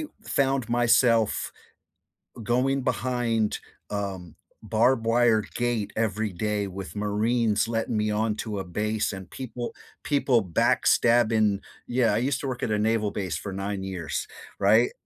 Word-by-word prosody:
I 220 Hz, -, -20 dB
found 135 Hz, -3 st, +1 dB
myself 120 Hz, -2 st, +3 dB, 0.9 s
going 130 Hz, +5 st, +1 dB
behind, 120 Hz, -3 st, 0 dB, 0.3 s
um, 95 Hz, -5 st, -4 dB, 0.3 s
barbed 115 Hz, +2 st, +2 dB
wire 115 Hz, -1 st, +4 dB
gate 120 Hz, -4 st, -1 dB
every 110 Hz, -1 st, 0 dB
day 105 Hz, +2 st, -1 dB
with 95 Hz, +1 st, -8 dB
marines 105 Hz, +2 st, +1 dB
letting 115 Hz, 0 st, -1 dB
me 105 Hz, 0 st, +1 dB
onto 105 Hz, 0 st, -1 dB
a -, -, -3 dB
base 105 Hz, +4 st, -1 dB
and 95 Hz, -2 st, -8 dB
people 125 Hz, -2 st, -6 dB, 0.3 s
people 140 Hz, -5 st, +2 dB
backstabbing 110 Hz, +3 st, +3 dB, 0.3 s
yeah 120 Hz, -3 st, +2 dB
I -, -, +2 dB
used 135 Hz, +2 st, 0 dB
to 140 Hz, -, -3 dB
work 125 Hz, -1 st, -4 dB
at -, -, -1 dB
a 105 Hz, -, +1 dB
naval 110 Hz, -1 st, +1 dB
base 95 Hz, -4 st, -3 dB
for 100 Hz, -, -6 dB
9 100 Hz, 0 st, -3 dB
years 95 Hz, -4 st, -4 dB, 0.3 s
right? 110 Hz, +5 st, +4 dB
110 Hz, 140 wpm, -26 LUFS, 105-120 Hz, 0.9 s, wire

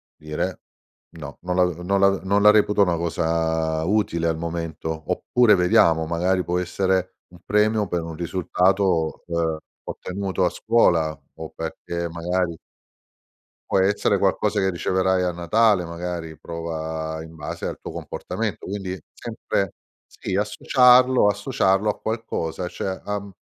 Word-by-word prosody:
Dire: 75 Hz, 0 st, -4 dB, 0.6 s
"No, 75 Hz, -3 st, -9 dB
non 90 Hz, +1 st, -2 dB
la 90 Hz, -, +4 dB
uhm, 90 Hz, -1 st, -2 dB
non 100 Hz, +2 st, +2 dB
la 100 Hz, 0 st, +6 dB
non 95 Hz, -, -1 dB
non 100 Hz, +2 st, +2 dB
la 105 Hz, -, +9 dB
reputo 105 Hz, -1 st, +4 dB
una 90 Hz, -3 st, +1 dB
cosa 80 Hz, -1 st, 0 dB
utile 85 Hz, -4 st, +1 dB
al 80 Hz, -1 st, 0 dB
momento." 80 Hz, -1 st, -4 dB
Oppure, 125 Hz, -3 st, +3 dB
vediamo, 85 Hz, -3 st, +4 dB
magari 90 Hz, +3 st, 0 dB
può 90 Hz, +1 st, -1 dB
essere 95 Hz, 0 st, -1 dB
un 90 Hz, -, -16 dB
premio 105 Hz, +1 st, +2 dB
per 85 Hz, -2 st, -2 dB
un 80 Hz, 0 st, -6 dB
risultato, 90 Hz, 0 st, 0 dB
uhm, 85 Hz, -2 st, -1 dB, 0.3 s
ottenuto 95 Hz, 0 st, -2 dB
a -, -, +3 dB
scuola 85 Hz, -9 st, +2 dB, 0.2 s
o 80 Hz, -1 st, -7 dB
perché 85 Hz, +1 st, -4 dB
magari 85 Hz, +1 st, -1 dB, 1.2 s
"puo' -, -, +3 dB
essere 100 Hz, +1 st, +2 dB
qualcosa 100 Hz, +2 st, +1 dB
che 95 Hz, 0 st, +2 dB
riceverai 95 Hz, +1 st, +1 dB
a 90 Hz, -1 st, 0 dB
Natale, 95 Hz, +3 st, +2 dB
magari 85 Hz, -2 st, -6 dB
prova 80 Hz, -1 st, -5 dB
in 80 Hz, 0 st, -12 dB
base 75 Hz, -2 st, -6 dB
al -, -, -5 dB
tuo -, -, -7 dB
comportamento." -, -, -5 dB
Quindi 95 Hz, -1 st, -4 dB
sempre 95 Hz, -2 st, -3 dB, 0.3 s
sì, 95 Hz, -, -5 dB
associarlo 125 Hz, +3 st, +4 dB
associarlo 105 Hz, -1 st, +1 dB
a 105 Hz, -, -1 dB
qualcosa, 90 Hz, -6 st, -3 dB
cioè, 95 Hz, +1 st, -4 dB
uhm, 100 Hz, -1 st, -4 dB
90 Hz, 145 wpm, -23 LUFS, 80-100 Hz, 1.2 s, la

